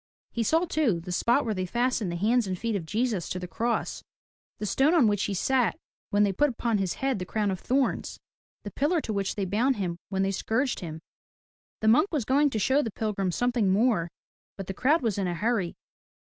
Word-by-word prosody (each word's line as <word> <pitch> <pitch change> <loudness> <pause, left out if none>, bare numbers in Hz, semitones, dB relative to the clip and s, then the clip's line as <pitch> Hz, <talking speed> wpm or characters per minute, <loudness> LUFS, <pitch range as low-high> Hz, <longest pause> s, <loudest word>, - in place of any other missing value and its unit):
He 235 - -2
saw 320 - +2
too, 285 - +1
the 180 +2 -7
spot 240 +9 +2
where 220 - 0
they 185 -2 -3
fastened 240 -3 0
the - - -3
hands 220 +5 +2
and 185 -1 -2
feet 230 +2 -2
of 170 -5 -4
Jesus 215 -3 -1
to - - -3
the 180 0 -5
cross, 235 +6 -2 0.6
the 210 - -4
stone 275 - +3
on 305 -8 +5
which 205 -2 +2
he 200 - -2
sat 245 -1 +1 0.3
when 205 0 +3
they 200 -1 +2
put 295 +10 +2
upon 230 -3 -1
his 190 -3 -1
head 270 -5 -1
the - - -3
crown 205 +1 -1
of 185 - -3
thorns, 265 +5 -1 0.4
the 205 - -6
pillar 300 - +1
to 225 - -4
which 200 -1 -1
they 200 - -1
bound 235 +8 +1
him 180 -5 -3
when 190 -1 0
they 195 - +1
scourged 235 +7 -1
him. 160 -3 -7 0.8
The 220 - 0
monk 280 - +5
was 290 -9 -1
going 285 +4 +3
to 225 - -3
show 265 +7 +3
the 230 - -2
pilgrims 195 -4 -2
something 245 -5 +1
more 195 -4 +2 0.5
but 195 - -5
the 195 - -5
crowd 285 - +2
was 215 -4 0
in 190 - 0
a 175 - -2
hurry. 210 -2 -1
215 Hz, 225 wpm, -27 LUFS, 190-255 Hz, 0.8 s, on